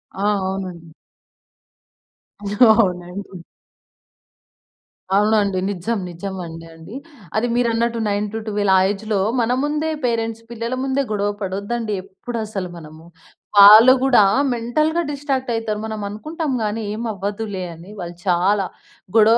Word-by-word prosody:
ఆ! 195 - -5 0.2
అవునండి. 185 -4 -5 1.8
అవునండి. 185 -2 -2 1.7
అవునండి. 205 -2 +2
నిజం. 205 +4 -2
నిజమండి 175 -2 -7
అండి. 165 +7 -12 0.4
అది 220 +3 +1
మీరన్నట్టు 235 -1 +1
9-12, 205 -1 -1
ఆ - - +5
ఏజ్‌లో, 210 0 -2 0.2
మన 235 0 +1
ముందే 300 +2 -1 0.2
పేరెంట్స్, 230 -1 -1
పిల్లల 235 +2 -3
ముందే 270 +1 0
గొడవ 205 -1 0
పడొద్దండి 205 +4 -3
ఎప్పుడసలు 210 -1 -5
మనము. 155 0 -12 0.5
వాళ్ళు 215 +5 +10
గూడా 265 -5 +5 0.3
మెంటల్‌గా 305 +8 0
డిస్ట్రాక్టయితారు. 260 -7 -2
మనం 220 -1 -5
అనుకుంటాం 305 +7 -4
గానీ, 215 +1 -2
ఏమవ్వదులే 205 -3 -4
అని. 170 +5 -13
వాళ్ళు 175 -1 -7
చాలా, 185 +2 +2 0.5
గొడవ 225 +1 +6
210 Hz, 100 wpm, -20 LUFS, 190-230 Hz, 1.8 s, వాళ్ళు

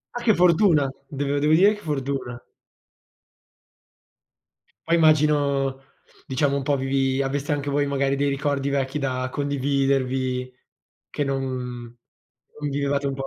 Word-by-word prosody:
Ma 245 - -3
che 220 -4 +4
fortuna! 170 -4 +4 0.2
Dev 145 0 -2
devo 150 +2 +3
dire 195 +6 +6
che 210 - -10
fortuna! 135 -5 -3 2.5
Poi 165 - +3
immagino 145 -4 +2 0.5
diciamo 140 +1 +1
un 140 - -3
po' 145 +1 +1
vi 135 0 0
aveste 140 +2 -1
anche 145 0 -3
voi 145 +1 +1
magari 140 0 0
dei 145 +1 +1
ricordi 140 0 -1
vecchi 140 0 -1
da 130 -2 -2
condividervi, 135 -2 -1 0.6
che 145 - -2
non 135 -1 -1
mhmm, 125 -2 -6 0.6
non 145 -1 -2
vivevate 140 0 -1
un 135 - -2
po' 135 0 -5
140 Hz, 135 wpm, -23 LUFS, 135-145 Hz, 2.5 s, dire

